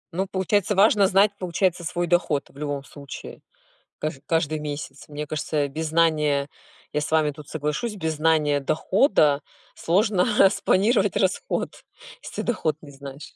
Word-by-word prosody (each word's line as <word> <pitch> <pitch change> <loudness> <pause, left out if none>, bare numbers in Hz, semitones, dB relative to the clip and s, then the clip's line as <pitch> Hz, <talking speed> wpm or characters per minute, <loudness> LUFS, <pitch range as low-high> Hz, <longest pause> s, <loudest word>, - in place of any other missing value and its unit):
Ну, 190 +1 0
получается, 195 +2 0
важно 200 0 +5
знать, 195 +2 +4
получается, 180 -1 0
свой 175 +2 -2
доход 170 -4 +1
в - - -23
любом 145 -1 -3
случае, 140 -1 -10 0.6
каж 155 -2 -3
каждый 155 -1 0
месяц. 145 -2 -6
Мне 150 0 -5
кажется, 150 -1 -2
без 155 +3 -4
знания- 150 -3 +2 0.4
я 150 - +1
с 150 - -3
вами 155 -2 +3
тут 145 0 -12
соглашусь- 155 +9 -3
без 160 -5 -2
знания 150 -2 +2
дохода 155 - +2 0.3
сложно 190 +2 +2
распланировать 200 +2 +3
расход, 200 - -1 0.4
если - - -6
доход 190 -10 -1
не 145 - -12
знаешь. 140 +1 -10
160 Hz, 145 wpm, -24 LUFS, 150-190 Hz, 0.6 s, важно